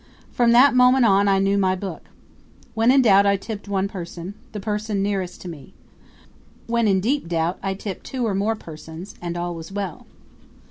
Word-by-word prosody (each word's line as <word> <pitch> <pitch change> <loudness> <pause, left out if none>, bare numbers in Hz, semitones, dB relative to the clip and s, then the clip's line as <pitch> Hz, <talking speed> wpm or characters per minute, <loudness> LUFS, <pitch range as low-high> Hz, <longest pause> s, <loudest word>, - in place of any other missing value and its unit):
From 240 -1 +3
that 255 +4 +6
moment 250 0 +5
on 200 -1 +4
I 195 -1 +4
knew 195 +1 +2
my 185 -1 +2
book. 185 -3 -7 0.7
When 225 +1 +2
in 265 0 +5
doubt 200 -3 +5
I 200 0 +3
tipped 205 +1 -7
one 195 -1 0
person 175 -1 -7 0.2
the 210 - -6
person 210 -1 -2
nearest 195 -3 -3
to - - -8
me. 150 -6 -10 0.9
When 235 -1 +1
in 195 -2 +3
deep 265 +2 0
doubt 170 +1 -1
I 195 0 -2
tipped 195 -1 -6
two 255 -3 -3
or 215 - 0
more 205 +3 0
persons. 160 0 -10
And 175 0 -4
all 175 0 -3
was 165 +1 -9
well. 195 -4 -5
200 Hz, 190 wpm, -22 LUFS, 180-220 Hz, 0.9 s, that